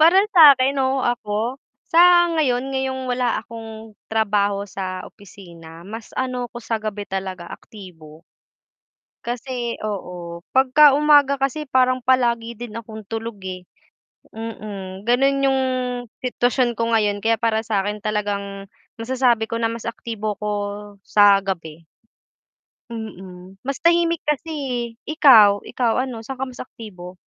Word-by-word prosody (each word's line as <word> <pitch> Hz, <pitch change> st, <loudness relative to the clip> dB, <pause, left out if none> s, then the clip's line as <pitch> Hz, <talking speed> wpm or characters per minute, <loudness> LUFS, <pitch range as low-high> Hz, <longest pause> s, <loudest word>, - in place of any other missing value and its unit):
Para 335 Hz, +4 st, +6 dB, 0.2 s
sa 300 Hz, -6 st, +9 dB
akin, 270 Hz, +1 st, +1 dB
oo, 265 Hz, 0 st, +1 dB
ako 235 Hz, +2 st, -2 dB, 0.2 s
sa 345 Hz, +1 st, +6 dB
ngayon 270 Hz, -4 st, 0 dB
ngayong 265 Hz, 0 st, -2 dB
wala 250 Hz, -1 st, 0 dB
akong 225 Hz, -1 st, -10 dB, 0.2 s
trabaho 205 Hz, -2 st, +1 dB
sa 185 Hz, -2 st, -5 dB
opisina 170 Hz, -4 st, -14 dB
mas, 220 Hz, +3 st, -8 dB
ano, 255 Hz, -1 st, -2 dB
ako -, -, -14 dB
sa 225 Hz, -1 st, -3 dB
gabi 210 Hz, -1 st, -4 dB
talaga 190 Hz, -2 st, -5 dB
aktibo. 165 Hz, -7 st, -13 dB, 1.0 s
Kasi 240 Hz, 0 st, -4 dB
oo, 175 Hz, -4 st, -6 dB
'pag 260 Hz, 0 st, +2 dB
ka 300 Hz, 0 st, +8 dB
umaga 290 Hz, -2 st, +4 dB
kasi 275 Hz, +3 st, -1 dB
parang 255 Hz, 0 st, +2 dB
palagi 235 Hz, -3 st, +1 dB
din 235 Hz, -2 st, -8 dB
akong 220 Hz, -2 st, -9 dB
tulog, 225 Hz, -1 st, -5 dB
eh, 185 Hz, -1 st, -6 dB, 0.7 s
Mm. 205 Hz, -4 st, -7 dB
Ganun, 270 Hz, +3 st, +3 dB
yung 265 Hz, 0 st, +2 dB, 0.6 s
sitwasyon 245 Hz, -1 st, 0 dB
ko 230 Hz, 0 st, -1 dB
ngayon. 210 Hz, -2 st, +1 dB
Kaya 225 Hz, 0 st, +2 dB
para 225 Hz, -1 st, 0 dB
sakin 205 Hz, -1 st, -2 dB
talagang 200 Hz, -2 st, -3 dB, 0.3 s
masasabi 240 Hz, -2 st, +1 dB
ko 230 Hz, -, -3 dB
na 230 Hz, 0 st, 0 dB
mas 230 Hz, 0 st, -6 dB
aktibo 215 Hz, -3 st, -4 dB
ko 210 Hz, +1 st, -3 dB, 0.5 s
sa 200 Hz, 0 st, +5 dB
gabi. 165 Hz, -4 st, -6 dB, 1.1 s
Mm, 190 Hz, -4 st, -9 dB
mas 275 Hz, +1 st, -4 dB
tahimik 335 Hz, -1 st, +2 dB
kasi, 300 Hz, +2 st, -1 dB, 0.6 s
ikaw, 230 Hz, -10 st, +6 dB
ikaw? 245 Hz, 0 st, 0 dB
ano, 255 Hz, -3 st, -5 dB
saan 265 Hz, +1 st, -7 dB
ka 265 Hz, -, -1 dB
mas 245 Hz, -, -14 dB
aktibo? 185 Hz, -7 st, -11 dB
225 Hz, 135 wpm, -21 LUFS, 200-255 Hz, 1.1 s, sa